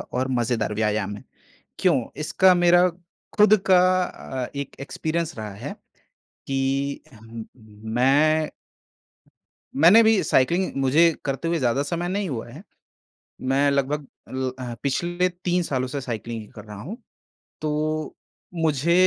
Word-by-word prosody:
और 130 +1 -3
मज़ेदार 115 -3 -1
व्यायाम 105 -2 -1
है, - - -13 0.6
क्यों? 170 -9 +3 0.2
इसका 185 +4 +4
मेरा 175 +1 +5 0.5
खुद 210 +1 +7
का 185 -1 +7 0.3
अ, 130 -6 -6
1 140 -1 -5
एक्सपीरियंस 160 +2 -3
रहा 105 -2 -6
है 100 - -7 0.7
कि 135 +1 -1 1.0
मैं 150 +4 +3 1.3
मैंने 175 +10 +7
भी 220 -2 +4
साइक्लिंग 170 +8 +2
मुझे 155 +6 +5
करते 140 +4 -2
हुए 170 0 +1
ज़्यादा 130 +1 +1
समय 170 +4 -3
नहीं 195 +1 -2
हुआ 120 -5 -5
है। 140 +9 -11 0.8
मैं 135 +2 +2
लगभग 140 +1 -1 0.5
अ, 125 -2 -5
पिछले 175 +6 0
3 180 0 -1
सालों 130 -5 -2
से 140 +2 -4
साइकलिंग 115 -3 -6
कर 105 - -10
रहा 105 -1 -9
हूँ, 205 - -7 0.6
तो 155 0 -2 0.5
मुझे 155 +1 +2
145 Hz, 125 wpm, -24 LUFS, 130-170 Hz, 1.3 s, खुद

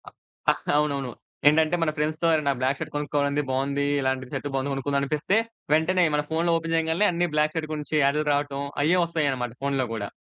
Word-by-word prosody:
ఆ - - -7 0.4
ఆహ్, - - -5 0.2
అవునవును. 140 -4 0 0.4
ఏంటంటే, 160 +2 +3
మన 160 -2 +2
ఫ్రెండ్స్‌తో 155 +2 0
ఎవరైనా 150 -3 +2
బ్లాక్ 135 +2 +1
షర్ట్ - - -5
కొనుక్కోవాలి, 145 0 0
బావుంది 140 +2 0 0.2
ఇలాంటి 130 -1 -1
షర్ట్ 145 - -3
బావుంది 135 +1 -1
కొనుకుందాం 140 +1 -1
అనిపిస్తే, 150 +8 0 0.4
వెంటనే 175 +3 +3
మన 150 - +1
ఫోన్‌లో 165 +1 +1
ఓపెన్ 165 0 -2
చేయగాల్నే 165 +5 +2
అన్ని 175 0 0
బ్లాక్ 150 +1 +1
షర్ట్ 155 -1 -3
గురించి 150 0 -4
యాడ్‌లు 145 +2 +2
రావటం, 145 -1 -1 0.2
అయ్యే 170 +5 +3
ఒస్తాయన్నమాట 140 -8 -1
ఫోన్‌లో 140 -2 0
గూడా. 105 -3 -4
150 Hz, 180 wpm, -25 LUFS, 140-160 Hz, 0.4 s, ఏంటంటే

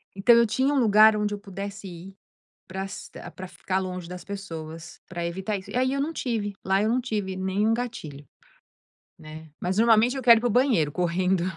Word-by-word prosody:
Então 215 +5 +5
eu 235 0 +5
tinha 260 +6 +1
um 275 - +2
lugar 215 -1 +6
onde 210 0 -1
eu - - -10
pudesse 200 0 -7
ir 180 +2 -10 0.5
prasta 190 +1 -7
para 185 - -7
ficar 185 +1 -3
longe 185 -2 -5
das 180 0 -8
pessoas, 165 -5 -8
para 175 -2 -5
evitar 190 +4 -3
isso. 190 - -11
E - - -6
aí 260 +1 +1
eu 275 - -1
não 305 - -1
tive. 220 -7 -2
Lá 190 +1 +2
eu 215 - +1
não 250 +2 +2
tive 205 -6 -3
nenhum 195 +4 0
gatilho, 160 - -5 0.9
né. 155 0 -11
Mas 185 +2 -2
normalmente 230 +2 +4
eu 265 - -4
quero 235 -2 +7
ir - - -13
para 245 - +1
o - - -1
banheiro, 225 - +2
correndo. 180 +1 0
200 Hz, 200 wpm, -25 LUFS, 180-230 Hz, 0.9 s, quero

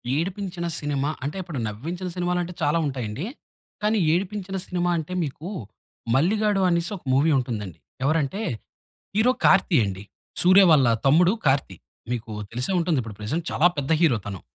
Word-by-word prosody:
ఏడిపించిన 180 +2 -3
cinema 145 -1 -1
అంటే, 145 +7 -3
ఇప్పుడు 170 -7 -5
నవ్వించిన 165 - -5
సినిమాలు 180 0 0
అంటే 175 +1 -7
చాలా 150 +3 +2
ఉంటాయండి. 130 - -3 0.6
కానీ 215 +1 +2 0.2
ఏడిపించిన 195 +1 -2
సినిమా 175 -1 -1
అంటే 160 +3 -4
మీకు 155 +4 -6 0.7
'మల్లిగాడు' 200 +6 +2
అనేసి 170 +1 0
ఒక - - -19
మూవీ 145 +5 +4
ఉంటుందండి. 110 -9 -4 0.3
ఎవరంటే 155 +6 0 0.7
హీరో 220 +4 +4
'కార్తీ' 165 -8 +5
అండి 95 0 -5 0.4
'సూర్య' 185 +2 +7
వాళ్ళ 140 -5 +5 0.2
తమ్ముడు. 170 +7 +5
'కార్తీ' 135 -9 +1 0.3
మీకు 115 -2 -5 0.2
తెలిసే 125 +8 -1
ఉంటుంది. 165 -4 +1
ఇప్పుడు 110 -3 -9
ప్రెజెంట్ 155 +11 -2
చాలా 170 - +4
పెద్ద 140 +2 -3
హీరో 150 -9 +4
తను. 95 -3 -6
160 Hz, 150 wpm, -24 LUFS, 130-180 Hz, 0.7 s, సూర్య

